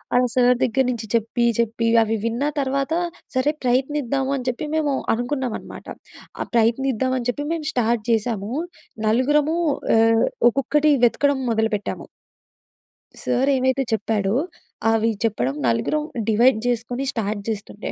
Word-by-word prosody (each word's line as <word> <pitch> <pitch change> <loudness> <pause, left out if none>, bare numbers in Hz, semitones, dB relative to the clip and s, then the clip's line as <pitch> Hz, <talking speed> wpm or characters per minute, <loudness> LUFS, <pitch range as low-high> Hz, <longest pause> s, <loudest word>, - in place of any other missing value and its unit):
ఆహ్, 250 0 +4
సార్ 250 -1 +4
దగ్గర 260 +2 +2
నుంచి 235 -3 -3
చెప్పి 230 +1 0 0.2
చెప్పి, 230 0 0 0.2
అవి 225 0 0
విన్న 230 +4 -1 0.2
తర్వాత 275 +2 -1 0.4
సరే 260 +3 +2
ప్రయత్నిద్దాము 265 +1 0
అని 255 -3 -5
చెప్పి 250 +5 -4
మేము 305 -2 +1 0.2
అనుకున్నామన్నమాట. 245 +1 -4 0.5
ఆహ్, - - -3
ప్రయత్నిద్దామని 255 +2 +1
చెప్పి 290 +4 -2
మేము 325 -2 -4
స్టార్ట్ 235 -2 0
చేశాము. 220 -2 -1 0.6
నలుగురము 295 +7 +2 0.4
ఆహ్, 225 0 +4 0.2
ఒక్కొక్కటి 295 +4 +2
వెతకడం 280 +3 +2
మొదలుపెట్టాము. 220 -2 -1 1.2
సర్ 250 +2 +1
ఏమైతే 260 +1 +1
చెప్పాడో, 210 -1 0 0.6
అవి 225 0 +2
చెప్పడం 140 - 0
నలుగురం 120 - 0 0.3
డివైడ్ 235 +3 +4
చేసుకొని 245 +2 -2
స్టార్ట్ 210 -2 -3
చేస్తుంటే, 210 0 -5
245 Hz, 120 wpm, -22 LUFS, 225-270 Hz, 1.2 s, ఆహ్